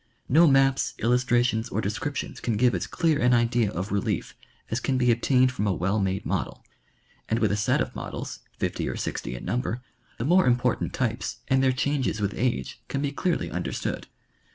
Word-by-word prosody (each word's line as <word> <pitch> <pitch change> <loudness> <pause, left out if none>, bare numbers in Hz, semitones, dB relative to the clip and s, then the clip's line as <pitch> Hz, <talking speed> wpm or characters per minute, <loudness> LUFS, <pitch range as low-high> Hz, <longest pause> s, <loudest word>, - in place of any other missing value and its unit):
No 165 +6 +6
maps, 135 -1 +3
illustrations 120 -1 +2
or 105 - -2
descriptions 110 +8 -3
can 115 -3 -1
give 125 +2 +4
as - - -2
clear 165 -4 +1
an 125 0 +4
idea 115 -2 +2
of 95 +1 -4
relief 100 -1 -1 0.4
as 115 - 0
can 130 0 0
be 125 -1 +4
obtained 130 +2 +3
from 105 -5 -2
a 100 - +2
well 95 +6 0
made 95 0 -1
model, - - -3 0.6
and 110 - +2
with 110 -3 +2
a - - +2
set 105 0 +1
of - - -3
models, - - -6 0.2
fifty - - -2
or - - -3
sixty - - -4
in - - -8
number, 125 0 -2 0.3
the 115 - -3
more 180 +3 +4
important 125 0 +1
tj^pes 120 -2 -2
and 130 0 +4
their 135 -1 +4
changes 130 -3 0
with 105 0 -1
age 120 -2 -2
can 140 +1 -2
be 140 - 0
clearly 175 +4 -1
understood. - - -3
120 Hz, 190 wpm, -26 LUFS, 110-130 Hz, 0.6 s, No